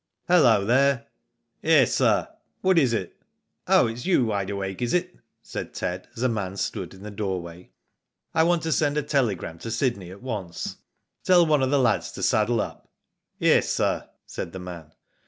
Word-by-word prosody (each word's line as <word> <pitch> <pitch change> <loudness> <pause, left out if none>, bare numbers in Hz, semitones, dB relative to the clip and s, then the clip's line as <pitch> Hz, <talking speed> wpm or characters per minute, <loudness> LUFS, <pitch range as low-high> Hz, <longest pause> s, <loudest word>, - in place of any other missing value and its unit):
"Hallo 120 - +5
there!" 130 +2 +3 0.3
" - - -53 0.2
Yes, - - +4
sir, - - +2 0.3
what 185 -2 +4
is 130 -6 +3
it? 95 -6 -4 0.2
" - - -53
"Oh, - - +5
it's 115 +2 -4
you, 180 -9 +3
Wide 100 -3 -1
Awake, 95 0 -4
is 120 +7 +1
it?" 180 0 -1 0.3
said - - -7
Ted, 90 +1 -3
as 120 - -3
a - - +4
man 100 -5 -3
stood 95 -3 -4
in 95 - -14
the 105 - -7
doorway. 90 -4 -5 0.6
"I 160 - +3
want 170 0 +2
to 160 - -1
send 145 +1 +1
a 150 - +1
telegram 105 - -1
to 115 - -6
Sydney 115 -5 -1
at 100 +5 -12
once. 100 -9 -5 0.5
Tell 180 -2 +5
one 150 -3 +3
of 130 - +1
the 145 - +3
lads 120 -6 +1
to - - -6
saddle 110 +1 +2
up." - - -7 0.5
"Yes, - - +3
sir," - - 0 0.2
said 85 - -6
the - - -6
man. 85 -4 -9
115 Hz, 190 wpm, -25 LUFS, 95-140 Hz, 0.6 s, Hallo